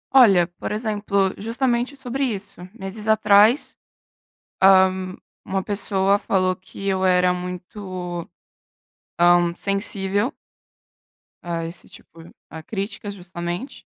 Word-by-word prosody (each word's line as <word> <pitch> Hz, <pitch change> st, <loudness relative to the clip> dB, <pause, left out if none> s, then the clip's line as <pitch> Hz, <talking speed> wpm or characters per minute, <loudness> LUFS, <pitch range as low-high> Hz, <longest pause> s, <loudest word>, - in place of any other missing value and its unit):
Olha, 200 Hz, -9 st, +7 dB
por -, -, -4 dB
exemplo, 205 Hz, -3 st, 0 dB
justamente 240 Hz, +4 st, -1 dB
sobre 265 Hz, +1 st, -3 dB
isso. 205 Hz, -7 st, -4 dB
Meses 210 Hz, 0 st, -8 dB
atrás, 220 Hz, +3 st, +4 dB, 1.7 s
hã, -, -, -14 dB
uma 195 Hz, 0 st, +1 dB
pessoa 200 Hz, -1 st, +1 dB
falou 185 Hz, -2 st, +1 dB
que 185 Hz, +2 st, -10 dB
eu 190 Hz, -1 st, 0 dB
era 180 Hz, -1 st, +4 dB
muito, 180 Hz, -1 st, -6 dB, 1.0 s
hã, 175 Hz, -1 st, +4 dB
sensível 200 Hz, -, 0 dB, 1.1 s
a 170 Hz, -1 st, -3 dB
esse 170 Hz, +2 st, -9 dB
tipo 165 Hz, +1 st, -15 dB, 0.2 s
a 160 Hz, 0 st, -9 dB
crítica 200 Hz, +2 st, -5 dB
justamente. 175 Hz, +4 st, -6 dB
195 Hz, 105 wpm, -22 LUFS, 180-215 Hz, 1.7 s, Olha